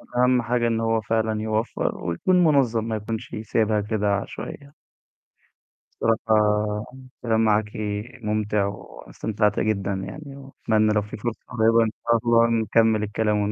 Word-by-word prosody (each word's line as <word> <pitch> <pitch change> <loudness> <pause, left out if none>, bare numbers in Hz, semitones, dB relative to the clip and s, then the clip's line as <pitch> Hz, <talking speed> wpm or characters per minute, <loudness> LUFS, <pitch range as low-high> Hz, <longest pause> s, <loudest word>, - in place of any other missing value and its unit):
أهم 125 0 +3
حاجة 120 0 0
إن 115 -1 0
هو 115 -1 +1
فعلًا 110 0 -1
يوفَّر 110 +2 -2
ويكون 180 - +2
مُنظّم 130 -8 +3
ما 110 -1 -2
يكونش 110 +2 -5
سايبها 110 0 +1
كده 105 0 -1
عشوائيّة. 140 +7 -7 1.3
الصراحة، 105 -1 +1 0.4
الكلام 110 -2 +1
معاكِ 105 0 +2 0.5
مُمتِع 105 -1 0
وأنا 100 0 -8
استمتعت 105 -1 0
جدًا 100 -2 0
يعني، 140 +9 -7
وأتمنى 110 -6 0
لو 105 - +2
في 105 +1 -8
فرصة 115 +2 -4
قريبة 115 -1 +3
إن 110 - -1 0.2
شاء 115 0 +4
الله 115 0 +5
نكمّل 110 0 +2
الكلام 105 0 0
و 105 - -1
110 Hz, 140 wpm, -24 LUFS, 105-115 Hz, 1.3 s, الله